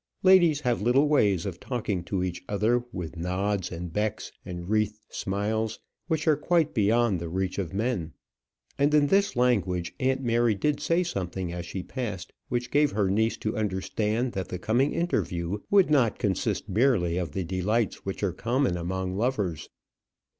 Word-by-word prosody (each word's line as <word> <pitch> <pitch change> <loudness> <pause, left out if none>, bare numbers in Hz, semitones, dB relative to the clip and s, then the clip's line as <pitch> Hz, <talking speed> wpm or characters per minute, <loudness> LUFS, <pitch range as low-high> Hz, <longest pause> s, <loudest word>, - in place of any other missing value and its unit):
Ladies 175 -6 +6
have 125 -5 0
little 130 +6 +4
ways 105 - +3
of 90 -3 -5
talking 105 -8 -2
to 95 0 -1
each 90 -1 -3
other, 110 +4 +2
with 90 -5 -6
nods 95 +2 -1
and 85 -1 -6
becks 105 +2 -2
and 90 -1 -7
wreathed 105 0 +1
smiles, 105 +3 -2 0.3
which 160 -2 -1
are 155 - +6
quite 160 +1 +1
beyond 110 -2 +2
the 85 0 -5
reach 95 +2 -2
of 95 -4 -3
men; 100 -4 -2 0.7
and 145 +2 +3
in 150 -1 +5
this 200 +6 +2
language 95 -8 +1
aunt 130 +1 +1
Mary 120 -2 +2
did 150 +8 0
say 170 +2 +1
something 95 - -3
as 85 -1 -5
she 95 0 -5
passed 105 -8 -5 0.2
which 120 0 -2
gave 145 +1 +3
her 100 -2 +1
niece 110 +3 +1
to 110 +2 -3
understand 110 +3 -1
that 95 -3 -4
the 90 - -4
coming 120 +9 +1
interview 95 - -1
would 195 -5 +4
not 125 -8 +3
consist 100 +1 -1
merely 100 -5 +2
of 85 -5 -4
the 95 - -2
delights 95 +6 -1
which 95 +1 -5
are 95 -4 +1
common 120 0 0
among 95 +2 -3
lovers. 105 - -1
105 Hz, 170 wpm, -27 LUFS, 95-125 Hz, 0.7 s, Ladies